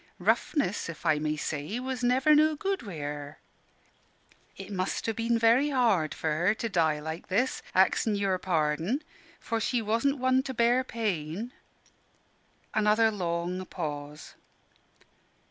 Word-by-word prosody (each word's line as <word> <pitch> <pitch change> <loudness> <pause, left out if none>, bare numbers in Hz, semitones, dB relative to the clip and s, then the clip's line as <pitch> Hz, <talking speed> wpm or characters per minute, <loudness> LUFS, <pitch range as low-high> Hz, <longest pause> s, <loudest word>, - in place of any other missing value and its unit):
Roughness, 210 - 0
if 165 - -9
I 150 - +3
may 155 0 -1
say, 155 +9 -3
was 255 -1 -4
never 260 +5 +4
no 310 +1 +4
good 390 +5 -2
wi' 200 -8 -8
her. 145 0 -6 1.2
It 195 +1 -9
must 185 -1 -2
ha' 225 - 0
been 230 +1 +1
very 230 +6 +4
hard 225 - +2
for 160 - -2
her 175 +7 +2
to 230 - -3
die 160 -7 +1
like 160 +2 -6
this, 235 +8 0
axin 220 -3 +3
your 195 -2 0
parden, 165 - 0 0.4
for 230 -1 -2
she 240 +2 0
wasn' 230 +6 +1
one 260 0 +3
to 265 -1 -6
bear 240 +2 +3
pain." 210 -3 -3 1.2
Another 215 +1 +3
long 180 -1 -2
pause. 150 -3 -6
210 Hz, 140 wpm, -28 LUFS, 160-245 Hz, 1.2 s, never